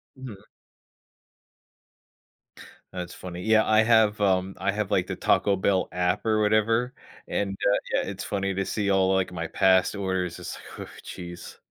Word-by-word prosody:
Mhm. 130 -6 -9 2.6
That's 90 -1 -6
funny. 90 -1 -8
Yeah, 110 0 +4
I 110 0 +4
have, 110 -2 +4
um 95 -1 +1
I 100 +1 0
have, 105 -1 -3
like, 90 - +1
the - - -3
Taco 100 - +2
Bell 95 0 +1
app, 90 +3 -1
or 110 -1 +2
whatever, 115 +4 +2 0.3
and, 100 -1 -1
uh, 100 +1 +1 0.2
yeah, - - +2
it's 95 -1 -6
funny 100 -1 -2
to 95 0 -2
see 100 -2 -2
all, 95 -1 +3
like, 95 -1 0
my 85 -2 -4
past 95 +2 +3
orders, 95 -3 -2
it's 90 - -6
like, - - -12
"Oh, - - -14
jeez." 85 -1 -9
95 Hz, 165 wpm, -26 LUFS, 95-105 Hz, 2.6 s, Yeah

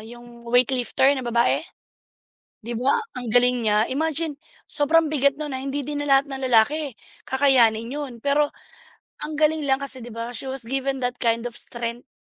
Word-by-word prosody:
yung 240 +1 -12
weightlifter 250 +2 +3
na 265 - -2
babae, 240 -1 +1 1.0
di 235 +1 -7
ba? 250 +5 +2 0.2
Ang 245 -3 -5
galing 245 +2 +4
niya. 215 0 +3
Imagine, 320 +1 -1 0.3
sobrang 320 +3 +3
bigat 280 -2 +1
nun 300 -3 -5
na 260 - -3
hindi 275 0 -3
din 290 -1 -3
na 290 - -3
lahat 275 0 +5
ng 270 -2 -7
lalaki 265 +3 +2 0.3
kakayanin 250 -3 +3
yun. 290 -4 -5
Pero 285 +4 +1 0.7
ang 305 0 -5
galing 305 -1 +1
lang 265 0 +2
kasi 260 -1 -5
di 240 - -8
ba? 230 +1 -6
She 265 +3 -6
was 265 -2 -2
given 270 +1 -2
that 245 0 -3
kind 230 0 +1
of 245 - -4
strength, 235 +1 -3
260 Hz, 175 wpm, -23 LUFS, 240-285 Hz, 1.0 s, lahat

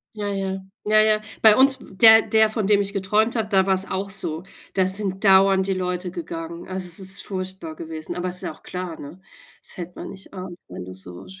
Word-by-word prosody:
Ja, 205 -1 -4
ja. 195 -1 -3 0.2
Ja, 215 +1 +4
ja, 215 0 +3 0.2
bei 220 -1 +7
uns 265 +1 +4
der 220 +3 +6
der, 220 0 +2
von 220 -3 -1
dem 205 -1 +4
ich 200 0 -3
geträumt 210 +4 0
habe, 220 -2 -1
da 190 -2 +3
war 195 - +2
es 190 0 0
auch 195 +1 -3
so, 165 -4 0 0.3
da 190 -1 +3
sind 190 0 0
dauernd 195 -1 +5
die 195 - -1
Leute 180 -1 -3
gegangen. 170 -1 -7
Also, 185 -1 -3
es 170 +1 +1
ist 190 +1 +2
furchtbar 185 -4 -6
gewesen, 160 -1 -7
aber 180 +1 -3
es 180 0 -1
ist - - -3
auch - - -12
klar, 180 -3 -7
ne? 145 +6 -10 0.4
Das - - -9
hält 175 0 -8
man - - -8
nicht 190 0 -12
aus, 185 -1 -7
wenn 90 - -8
du 95 - -9
so. 90 -1 -11
190 Hz, 225 wpm, -22 LUFS, 180-205 Hz, 0.4 s, bei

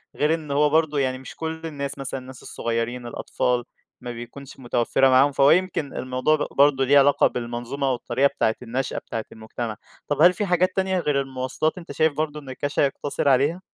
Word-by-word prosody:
غير 150 +2 +2
إن 155 -3 -4
هو 150 +1 +3
برضو 155 -1 +2
يعني، 130 -2 0
مش 130 - -11
كل 160 0 -5
الناس، 140 -3 -4
مثلًا 135 -1 -3
الناس 130 0 -12
الصغيرين، 115 +1 -3
الأطفال، 125 +1 -1 0.4
ما 125 - -6
بيكونش 120 +4 -10
متوفَّرة 120 +1 +2
معاهُم. 130 +2 +5
فهو 140 0 +4
يمكن 180 -5 +1
الموضوع 130 +4 0
ب 150 - -2
برضو 140 -1 +5
ليه 140 +2 +6
علاقة 140 +1 +4
بالمنظومة 120 +3 -3
والطريقة 125 +2 +1
بتاعة 115 -5 0
النشأة 125 +2 -3
بتاعة 110 -1 -5
المجتمع. 110 0 -6 0.3
طَب 145 0 -1
هل 180 +2 +7
فيه 205 - -2
حاجات 185 0 +1
تانية 190 -1 +1
غير 145 -4 +1
المواصلات 135 +5 -2
أنتَ 170 -5 -9
شايِف 155 +2 +2
برضو 150 0 -3
إن 140 -3 -12
الكاش 145 +2 -3
هيقتصِر 140 0 0
عليها؟ 140 +7 +2
140 Hz, 190 wpm, -23 LUFS, 125-150 Hz, 0.4 s, هل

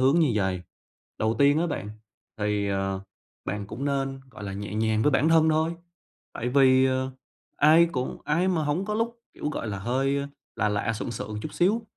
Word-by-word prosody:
hướng 135 +6 +4
như 155 -6 +4
vầy. 95 -3 0 0.6
Đầu 110 +1 +1
tiên 145 +1 +5
á 170 - +1
bạn, 125 -10 -4 0.5
thì, 105 -1 0
ờ, 95 -1 -1 0.4
bạn 100 +1 -3
cũng 125 +6 -6
nên, 135 -1 -1
gọi 105 - -9
là, 100 - -4
nhẹ 100 +1 -5
nhàng 110 0 +1
với 150 - +4
bản 145 +3 +3
thân 160 -1 +5
thôi. 160 +2 +1 0.6
Tại 120 - -3
vì, 130 0 +5
ờ, 130 0 0 0.5
ai 160 +3 +6
cũng 130 -3 -2
ai 170 +5 +1
mà 170 -4 +1
hổng 150 +6 0
có 210 +1 -2
lúc, 230 +2 -2
kiểu, - - -3
gọi 115 - -4
là, 100 - -3
hơi 135 +6 0 0.3
lạ 105 - +1
lạ, 105 +2 0
sượng 115 +2 -4
sượng 110 -2 -5
chút 155 - -5
xíu, 210 +6 +2
130 Hz, 200 wpm, -26 LUFS, 105-155 Hz, 0.6 s, ai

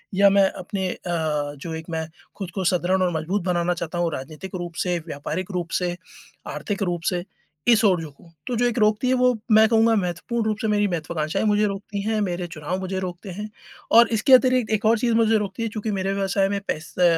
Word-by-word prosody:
या 200 +1 +6
मैं 195 -1 +4
अपने 190 0 -4
अ, 155 -4 -2
जो 160 +4 -6
एक 160 0 -7
मैं 160 -1 -2 0.3
ख़ुद 190 -3 -5
को 190 - -1
सुदृढ़ 180 +2 +2
और 180 - +1
मजबूत 175 +4 -2
बनाना 175 -1 +1
चाहता 170 +1 -5
हूँ, 170 -2 +1
राजनीतिक 155 +8 -7
रूप 175 -1 -5
से, 180 -1 0
व्यापारिक 160 +6 -4
रूप 175 -2 -3
से, 175 -1 -1 0.5
आर्थिक 205 -2 -3
रूप 175 -3 -1
से 175 -1 -2 0.4
इस 230 -1 +5
ओर 185 -4 +3
झुकूँ। 160 +2 -12 0.2
तो 245 - -1
जो 245 - +2
एक 240 -1 0
रोकती 215 +3 +2
है - - +4
वो 250 0 +4 0.2
मैं 220 +1 +7
कहूँगा 225 0 +4
महत्वपूर्ण 210 +5 -2
रूप 215 -1 0
से 220 - 0
मेरी 205 -1 +2
महत्वाकांक्षाएँ 165 +2 -2
मुझे 210 0 +3
रोकती 200 +1 -4
हैं, 220 +1 0
मेरे 180 -3 -2
चुनाव 165 +3 -4
मुझे 190 0 -3
रोकते 185 +1 -6
हैं 210 +4 -6 0.4
और 235 +1 +8
इसके 225 +5 +3
अतिरिक्त 255 -3 +5
एक 215 0 0
और 230 +1 +5
चीज़ 235 -1 +1
मुझे 225 -1 +4
रोकती 205 +2 -3
है, 225 - -1
चूँकि 215 0 -3
मेरे 195 -1 -1
व्यवसाय 195 0 +1
में 200 - -1
पैसा 160 +3 -2
190 Hz, 215 wpm, -23 LUFS, 175-215 Hz, 0.5 s, और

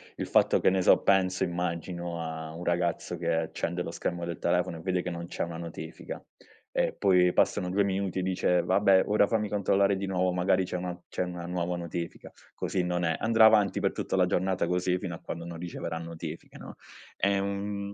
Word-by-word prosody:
il - - -3
fatto - - +3
che - - +5
ne 95 0 +1
so, - - +6
penso, 95 -1 +3
immagino 85 -1 -3
a 80 -1 -5
un 85 +2 -7
ragazzo 85 -1 -1
che 85 0 -2
accende 80 +2 -2
lo 85 - -5
schermo 85 0 -3
del 85 0 -4
telefono 85 -1 0
e - - -9
vede 90 +1 -1
che - - -4
non 85 0 -5
c'è - - -3
una 85 -1 -5
notifica 80 -1 -7 0.5
e - - +1
poi 90 -2 +3
passano 90 - +2
2 100 +3 +2
minuti 95 -1 -1
e - - 0
dice: 90 -1 +1
"Vabbè, 95 0 +4
ora 105 0 +4
fammi 105 -2 0
controllare 100 -1 +2
di 100 - -3
nuovo 90 -1 +1
magari 90 +1 +2
c'è 90 0 -3
una 90 0 -4
c'è - - -1
una 90 -1 -5
nuova 90 0 -2
notifica", 85 0 -6 0.2
così 95 - -1
non 90 0 -1
è. 85 -1 +2
Andrà 115 0 +4
avanti 110 -2 +5
per - - +2
tutta - - -3
la - - +4
giornata 95 0 0
così, 90 0 +1
fino 90 -2 -5
a - - -11
quando 85 - -6
non 85 0 -7
riceverà 85 -1 -5
notifiche, 85 0 -8
no, - - -10 0.4
è 100 0 +2
un 100 +1 -3
90 Hz, 205 wpm, -28 LUFS, 85-95 Hz, 0.5 s, so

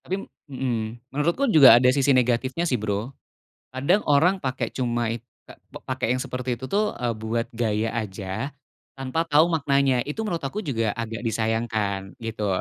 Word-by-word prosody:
Tapi 190 +2 -4 0.2
mmm, 120 -4 -3 0.2
menurutku 170 - 0
juga 140 -8 +9
ada 125 +1 +4
sisi 140 0 +3
negatifnya 125 +6 +1
sih, 125 -9 0
Bro. 105 +4 -2 0.6
Kadang 155 +11 +2
orang 165 +7 +4
pake 130 -5 -3
cuma 120 -3 -1
i 115 - -3 0.2
ka - - -15 0.2
pa - - -7 0.2
pake 125 - -1
yang 130 - -2
seperti 125 -2 -3
itu 130 +3 -8
tuh, 210 +2 +1
eee, 120 -1 -1
buat 115 +1 -2
gaya 110 -1 -1
aja 100 +3 -4 0.5
tanpa 135 +5 -2
tahu 155 +3 +4
maknanya. 140 -4 +2
Itu 150 +10 -3
menurut 175 -8 -3
aku 210 +9 -5
juga 115 - -1
agak 115 -1 -4
disayangkan 110 -4 -1
gitu. 110 -2 -3
125 Hz, 165 wpm, -24 LUFS, 115-145 Hz, 0.6 s, juga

